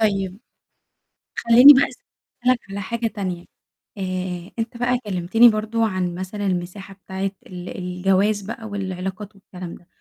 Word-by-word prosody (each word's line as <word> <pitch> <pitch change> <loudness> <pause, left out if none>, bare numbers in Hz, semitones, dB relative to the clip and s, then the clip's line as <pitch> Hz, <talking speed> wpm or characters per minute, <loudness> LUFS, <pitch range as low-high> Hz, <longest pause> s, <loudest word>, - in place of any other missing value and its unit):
طيب، 195 -3 0 1.0
خلّيني 245 +5 +9
بقى 275 0 +5 0.6
أسألك 255 -1 +4
على 200 +1 -5
حاجة 230 +4 -2
تانية، 185 -5 -5 0.5
آآ، 185 -2 -4
أنت 225 +1 -3
بقى 245 +1 +1
كلّمتني 200 +5 +4
برضه 220 +1 0
عن 185 -3 -2
مثلًا 190 +3 -5
المساحة 185 +2 -4
بتاعة 190 0 -4 0.2
ال 180 -1 -8
الجواز 190 +3 +1
بقى 225 +3 -7
والعلاقات 195 0 -5
والكلام 180 -3 -9
ده، 175 - -19
195 Hz, 130 wpm, -22 LUFS, 185-220 Hz, 1.0 s, خلّيني